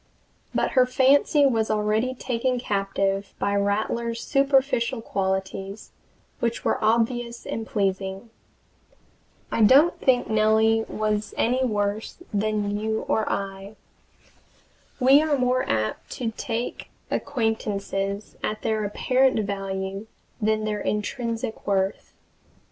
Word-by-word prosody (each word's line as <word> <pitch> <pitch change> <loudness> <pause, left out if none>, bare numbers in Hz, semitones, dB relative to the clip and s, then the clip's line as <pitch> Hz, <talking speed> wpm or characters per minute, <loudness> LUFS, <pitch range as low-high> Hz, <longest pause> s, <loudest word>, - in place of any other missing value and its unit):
But - - 0
her 255 -1 +4
fancy 275 +3 +4
was 225 -5 +2
already 215 +4 +1
taken 250 0 -1
captive 195 -2 -1
by 200 - 0
Rattler's 220 +3 -1
superficial 270 -3 +2
qualities, 195 -1 -3 0.5
which 235 0 -2
were - - 0
obvious 235 +2 0
and 225 0 -4
pleasing. 195 +2 -2 1.2
I - - 0
don't 275 +10 +6
think 250 -2 +2
Nellie 220 +1 +3
was 215 -1 -2
any 250 +3 +2
worse 210 -2 -1 0.2
than 205 0 0
you 220 +1 -1
or 220 - +1
I. 195 +1 -4 1.2
We 270 +3 +6
are 310 -2 +1
more 255 0 +1
apt 110 -1 -1
to 235 -3 -3
take 235 0 -4 0.2
acquaintances 205 -5 -2
at 215 0 -3
their 220 -1 0
apparent 255 +4 +2
value 195 +1 -4 0.3
than 215 0 +1
their 210 -1 -2
intrinsic 230 +2 -3
worth. 195 -1 -1
220 Hz, 110 wpm, -25 LUFS, 200-245 Hz, 1.2 s, don't